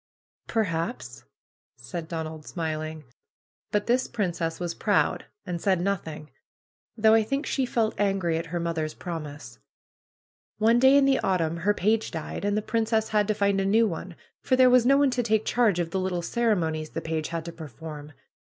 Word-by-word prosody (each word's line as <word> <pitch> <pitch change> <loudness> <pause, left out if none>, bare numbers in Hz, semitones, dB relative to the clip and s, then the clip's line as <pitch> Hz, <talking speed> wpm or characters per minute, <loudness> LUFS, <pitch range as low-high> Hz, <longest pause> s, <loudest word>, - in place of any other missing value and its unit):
Perhaps 190 -2 -2 0.3
!" - - -67
said 170 -3 -6
Donald 160 -2 -6
smiling. 155 -2 -4 0.7
^'But 210 0 0
this 250 +2 +2
princess 175 -6 -2
was 175 -1 -2
proud, 205 +3 +1 0.2
and 175 -3 -4
said 190 -3 +2
nothing. 165 -5 -3 0.7
Though 220 0 +5
I 225 - +6
think 275 +7 -2
she 265 -2 0
felt 225 -2 0
angry 190 -5 +1
at 165 - -6
her 175 +2 -3
mother's 165 -2 -2
promise. 150 -8 -7 1.0
One 225 +2 +4
day 265 +2 +6
in 280 - +5
the 270 -1 +3
autumn 170 -4 0
her 205 +5 +1
page 220 +3 +1
died, 160 +3 -5
and 205 +1 +1
the 215 - -1
princess 220 0 0
had 210 -1 +2
to 215 - +1
find 200 -1 +2
a - - 0
new 220 +4 +4
one, 175 -1 -6 0.3
for 260 - +2
there 255 -1 +6
was 250 -1 +5
no 275 +1 +6
one 280 -2 +3
to 250 0 0
take 220 -2 +1
charge 230 -7 +2
of 170 -1 -2
the 190 - -1
little 185 -2 -2
cere 230 +3 +1
monies 160 -3 -2
the 165 - -3
page 160 -1 -2
had 165 -1 -4
to 170 - -5
perform. 150 0 -9
185 Hz, 190 wpm, -26 LUFS, 165-220 Hz, 1.0 s, I